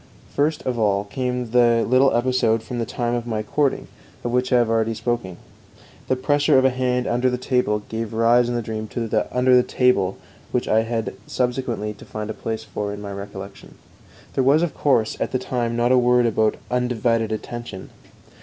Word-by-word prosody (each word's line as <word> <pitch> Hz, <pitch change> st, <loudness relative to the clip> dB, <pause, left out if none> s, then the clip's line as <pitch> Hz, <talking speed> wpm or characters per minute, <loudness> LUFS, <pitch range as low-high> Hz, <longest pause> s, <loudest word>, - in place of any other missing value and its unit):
First 150 Hz, +2 st, +1 dB
of 125 Hz, -2 st, -1 dB
all 100 Hz, -2 st, +2 dB
came 125 Hz, +2 st, -3 dB
the 120 Hz, -1 st, +4 dB
little 130 Hz, +2 st, +4 dB
episode 120 Hz, -2 st, +1 dB
from 120 Hz, +1 st, -5 dB
the 115 Hz, -, -2 dB
time 120 Hz, 0 st, -2 dB
of 120 Hz, 0 st, -2 dB
my 110 Hz, -2 st, -2 dB
courting, 140 Hz, +5 st, 0 dB, 0.4 s
of 120 Hz, -, -2 dB
which 125 Hz, +1 st, 0 dB
I 125 Hz, -, +5 dB
have 120 Hz, -1 st, +3 dB
already 115 Hz, 0 st, +1 dB
spoken; 115 Hz, -7 st, -3 dB, 0.7 s
the 130 Hz, -, +2 dB
pressure 145 Hz, +2 st, +2 dB
of 130 Hz, -, +4 dB
a 130 Hz, -, +4 dB
hand 125 Hz, -1 st, 0 dB
under 125 Hz, +2 st, +1 dB
the 125 Hz, -, -1 dB
table 125 Hz, -5 st, 0 dB
gave 110 Hz, -1 st, -4 dB
rise 120 Hz, +2 st, +3 dB
in 120 Hz, -, -1 dB
the 120 Hz, -, -1 dB
dream 110 Hz, 0 st, -4 dB
to 115 Hz, +1 st, -4 dB
the 110 Hz, -1 st, 0 dB
"under 125 Hz, 0 st, +4 dB
the 125 Hz, -, +7 dB
table," 120 Hz, -7 st, +1 dB, 0.3 s
which 125 Hz, -, -1 dB
I 110 Hz, -, +3 dB
had 115 Hz, -1 st, -3 dB
subsequently 120 Hz, -4 st, -2 dB
to 105 Hz, -, -15 dB
find 110 Hz, 0 st, -5 dB
a -, -, -4 dB
place 110 Hz, 0 st, -4 dB
for 105 Hz, -1 st, -4 dB
in 105 Hz, -, -6 dB
my 100 Hz, -1 st, -6 dB
recollection. 100 Hz, 0 st, -9 dB, 0.6 s
There 135 Hz, -, +1 dB
was, 145 Hz, +5 st, +4 dB
of 170 Hz, -, -1 dB
course, 120 Hz, -7 st, +1 dB
at -, -, -1 dB
the -, -, +3 dB
time 120 Hz, -2 st, -2 dB
not 120 Hz, +1 st, +2 dB
a 130 Hz, -, +6 dB
word 125 Hz, 0 st, +4 dB
about 110 Hz, -1 st, +2 dB, 0.2 s
"undivided 120 Hz, -2 st, 0 dB
attention." 110 Hz, -2 st, -6 dB
120 Hz, 200 wpm, -22 LUFS, 110-125 Hz, 0.7 s, the